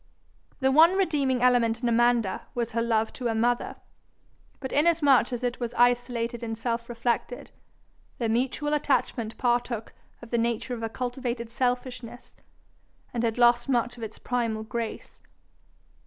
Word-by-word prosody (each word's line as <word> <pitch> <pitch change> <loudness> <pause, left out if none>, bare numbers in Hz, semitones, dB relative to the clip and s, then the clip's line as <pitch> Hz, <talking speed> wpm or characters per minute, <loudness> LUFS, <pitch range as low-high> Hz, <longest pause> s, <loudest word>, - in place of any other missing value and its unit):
The 265 0 +3
one 325 +6 +6
redeeming 280 -9 +1
element 240 -2 +3
in - - +2
Amanda 235 -3 +2
was 235 -1 -2
her 230 0 0
love 225 -1 0
to 250 - -3
her 225 - 0
mother, 240 +2 0 0.8
but 265 -2 -5
inasmuch 290 -5 +4
as 245 0 -4
it 245 0 -2
was 240 -2 -4
isolated 240 -1 +1
and 225 -1 -4
self 235 0 -3
reflected, 240 +1 -2 0.7
their 235 - -1
mutual 260 +6 0
attachment 265 -6 0
partook 240 -2 -1 0.3
of 235 - -12
the 235 - +1
nature 235 +2 -1
of 235 - -5
a 225 - -2
cultivated 245 -1 -4
selfishness, 245 -1 -3 0.8
and 235 - -1
had 230 -1 0
lost 240 +1 +4
much 240 -1 +1
of 240 - -12
its 220 -1 -6
primal 230 -3 -2
grace. 230 0 -5
240 Hz, 150 wpm, -27 LUFS, 230-250 Hz, 0.8 s, one